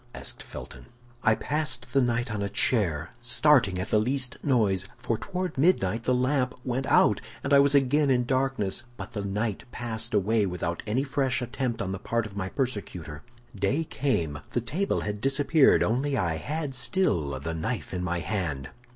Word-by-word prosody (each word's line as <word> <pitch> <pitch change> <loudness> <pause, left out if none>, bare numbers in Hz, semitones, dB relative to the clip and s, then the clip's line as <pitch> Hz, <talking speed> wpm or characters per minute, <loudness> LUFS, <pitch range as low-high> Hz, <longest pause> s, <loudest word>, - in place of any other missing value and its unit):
asked - - -5
Felton. - - -10 0.3
"I 110 -2 +4
passed 140 -4 -2
the 135 - +4
night 120 -1 0
on 105 - -2
a 100 - -1
chair, 100 - +1
starting 120 -4 +3
at 95 +4 -4
the 105 - +5
least 130 +2 0
noise, 100 -9 +2
for 120 -1 -1
toward 180 - -4
midnight 115 - +2
the 125 - +3
lamp 130 0 +1
went 130 +1 -1
out, - - +4 0.2
and - - 0
I 140 - +8
was 140 +1 +4
again 140 +2 +3
in 125 -2 +3
darkness. 130 -5 0
But - - -7
the 105 -3 -3
night 105 +3 -2
passed 115 -1 -4
away 105 +1 +2
without 85 -1 -3
any 120 +6 +1
fresh 135 -2 0
attempt 125 -2 -2
on 95 - -3
the 95 - -4
part 115 +2 -1
of 100 -2 -9
my 95 -2 -3
persecutor. 95 - -4 0.3
Day 140 +10 +1
came; 85 - -1
the 120 - +1
table 175 - -1
had 105 0 -4
disappeared, 140 +3 +4
only 135 +5 0
I 85 -6 0
had 150 - -3
still 120 - 0
the 80 +4 -4
knife 80 -1 -3
in 90 -1 -2
my 85 -1 -1
hand. 80 -11 -3
120 Hz, 180 wpm, -27 LUFS, 95-135 Hz, 0.3 s, I